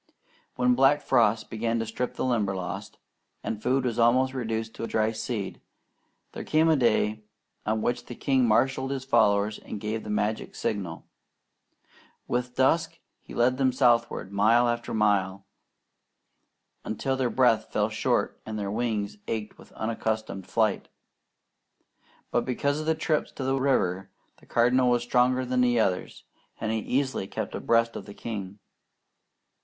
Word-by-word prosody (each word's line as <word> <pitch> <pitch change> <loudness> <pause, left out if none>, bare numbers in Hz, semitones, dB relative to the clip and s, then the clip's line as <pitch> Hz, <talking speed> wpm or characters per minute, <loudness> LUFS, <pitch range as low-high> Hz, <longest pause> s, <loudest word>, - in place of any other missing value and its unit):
When 125 0 +3
black 135 +3 +4
frosts 115 -3 +3
began 115 +1 -2
to 115 - -1
strip 115 +3 -4
the - - -2
Limberlost, 100 -7 -2 0.5
and 110 -1 -4
food 130 +2 +1
was 120 -2 -1
almost 130 +3 +4
reduced 115 -3 -3
to 115 - -5
dry 110 0 +1
seed, 110 -2 -4 0.7
there - - -6
came 160 +1 +3
a 160 - +5
day 110 -4 +2 0.5
on 110 0 0
which 120 0 -1
the 120 - -7
king 130 -2 +2
marshalled 130 +4 +2
his 135 -1 -3
followers 105 -4 +2
and 105 - -7
gave 110 +2 -3
the - - -8
magic 105 +1 -1
signal. 95 -6 -3 1.2
With 125 0 -2
dusk 135 +5 +2 0.2
he - - -12
led 125 +2 +2
them 130 -1 +3
southward, 120 -5 +2
mile 110 +4 +4
after 120 0 -2
mile, 100 -3 +1 1.4
until 135 +5 -2
their 130 -2 0
breath 125 -4 +2
fell - - +1
short, - - -1
and 110 0 -5
their 100 -1 -3
wings 105 -2 -2
ached 110 -2 -4
with - - -16
unaccustomed 110 -3 -3
flight; 110 -3 0 1.4
but - - +1
because 140 +3 -1
of 155 - -5
the 160 - +3
trips 155 -1 -1
to 135 - -5
the 135 0 0
river, 95 -8 +1 0.3
the - - -22
Cardinal 125 +2 +3
was 120 -1 +2
stronger 125 +1 +2
than 125 0 +1
the 120 -1 +3
others, 90 -4 -1 0.4
and 110 - -2
he 110 - 0
easily 130 -4 -1
kept - - -5
abreast 115 0 +1
of - - -7
the 100 - -10
king. 100 -4 -6
115 Hz, 155 wpm, -27 LUFS, 110-130 Hz, 1.4 s, a